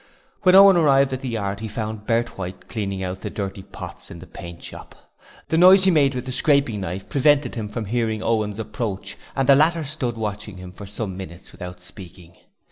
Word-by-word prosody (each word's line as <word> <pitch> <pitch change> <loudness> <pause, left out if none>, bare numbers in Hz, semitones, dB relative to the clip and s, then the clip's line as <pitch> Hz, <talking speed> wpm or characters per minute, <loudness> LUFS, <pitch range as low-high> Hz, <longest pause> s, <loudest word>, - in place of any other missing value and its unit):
When 185 0 +5
Owen 195 -1 +9
arrived 140 -4 +4
at 130 - -4
the 130 - -4
yard 100 -3 -3
he 110 - -5
found 110 -1 -5
Bert 120 0 0
White 90 0 -7
cleaning 100 -4 -3
out 95 0 -5
the - - -4
dirty 100 -1 -5
pots - - -10
in - - -9
the 90 - -11
paint 85 -2 -10
shop. - - -10 0.5
The 160 - +2
noise 185 +2 +8
he 190 - +5
made 140 -5 +3
with 125 0 -4
the 130 - -4
scraping 140 -6 +2
knife 95 +1 -5
prevented 145 -2 +2
him 110 -3 -4
from 110 +1 -4
hearing 110 0 -1
Owen's 105 -3 0
approach 110 -2 -4 0.2
and 135 -1 0
the 140 - +8
latter 160 +4 +3
stood 125 -5 -3
watching 105 -2 -5
him 90 0 -9
for 100 +2 -10
some 100 -1 -5
minutes 90 -1 -9
without 90 0 -9
speaking. 90 -2 -12
110 Hz, 210 wpm, -22 LUFS, 95-135 Hz, 0.5 s, Owen